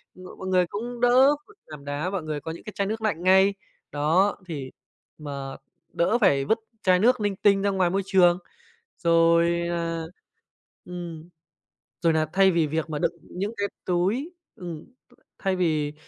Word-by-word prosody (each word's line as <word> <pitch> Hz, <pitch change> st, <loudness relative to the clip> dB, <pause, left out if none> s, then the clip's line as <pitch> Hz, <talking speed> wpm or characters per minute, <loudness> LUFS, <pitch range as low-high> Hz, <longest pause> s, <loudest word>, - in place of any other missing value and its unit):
m 185 Hz, -, -13 dB
mọi 190 Hz, -, -7 dB
người 185 Hz, -1 st, +3 dB
cũng 240 Hz, +5 st, -6 dB
đỡ 260 Hz, +4 st, +5 dB
phải 430 Hz, -, -19 dB
làm 150 Hz, -2 st, -11 dB
đá, 145 Hz, +5 st, -2 dB
mọi 190 Hz, -5 st, -3 dB
người 155 Hz, -1 st, -3 dB
có 160 Hz, -, -5 dB
những 165 Hz, -, -10 dB
cái 215 Hz, -, -8 dB
chai 200 Hz, -1 st, -1 dB
nước 220 Hz, +1 st, -3 dB
lạnh 175 Hz, -6 st, -1 dB
ngay, 190 Hz, +2 st, +5 dB, 0.4 s
đó, 165 Hz, +8 st, +2 dB
thì 140 Hz, -6 st, -6 dB, 0.5 s
mà 140 Hz, -3 st, -6 dB, 0.4 s
đỡ 210 Hz, +8 st, +2 dB
phải 140 Hz, -, +3 dB
vứt 225 Hz, +1 st, +1 dB, 0.2 s
chai 185 Hz, -1 st, +4 dB
nước 245 Hz, +3 st, +3 dB
linh 205 Hz, -1 st, 0 dB
tinh 200 Hz, 0 st, +3 dB
ra 200 Hz, -, +1 dB
ngoài 190 Hz, -3 st, +1 dB
môi 195 Hz, +2 st, 0 dB
trường. 180 Hz, -3 st, +4 dB, 0.7 s
Rồi, 170 Hz, +1 st, +3 dB
à, 165 Hz, -1 st, -2 dB, 0.8 s
ừm, 175 Hz, -2 st, -8 dB, 0.7 s
rồi 165 Hz, -1 st, +3 dB
nà 155 Hz, 0 st, +2 dB
thay 190 Hz, 0 st, +5 dB
vì 165 Hz, -3 st, +2 dB
việc 160 Hz, +1 st, -2 dB
mà 150 Hz, -2 st, -3 dB
đựng -, -, +1 dB
những 200 Hz, +5 st, -5 dB
cái 200 Hz, 0 st, 0 dB, 0.2 s
túi 195 Hz, -, 0 dB, 0.2 s
ừm, 170 Hz, -4 st, -8 dB, 0.5 s
thay 190 Hz, -2 st, 0 dB
vì 155 Hz, -5 st, 0 dB
180 Hz, 175 wpm, -25 LUFS, 160-200 Hz, 0.8 s, đỡ